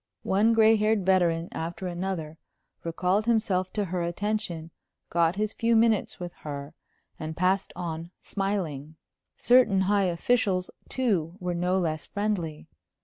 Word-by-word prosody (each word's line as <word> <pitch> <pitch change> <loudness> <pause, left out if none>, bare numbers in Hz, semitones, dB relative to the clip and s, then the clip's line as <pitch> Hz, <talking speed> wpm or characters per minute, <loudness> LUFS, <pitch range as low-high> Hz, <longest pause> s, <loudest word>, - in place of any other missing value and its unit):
One 210 +4 +3
gray 220 0 +6
haired 215 -2 +1
veteran 175 -3 +3
after 170 +3 -5
another 175 -3 -4 0.4
recalled 180 +6 0
himself 195 -5 +1
to 210 -2 0
her 180 -1 -2
attention, 175 -2 -2 0.4
got 170 0 +2
his 215 +1 -1
few 230 0 +2
minutes 225 -2 +2
with 175 -1 -6
her, 145 0 -6 0.5
and 155 0 -5
passed 185 +2 +1
on 165 -1 -5
smiling. 165 -7 -3 0.4
Certain 240 -6 +5
high 200 +1 +2
officials, 185 +1 +1 0.2
too, 185 -10 0
were 180 -1 -2
no 180 +2 +1
less 160 -4 -1
friendly. 200 -7 -2
185 Hz, 135 wpm, -27 LUFS, 165-210 Hz, 0.5 s, gray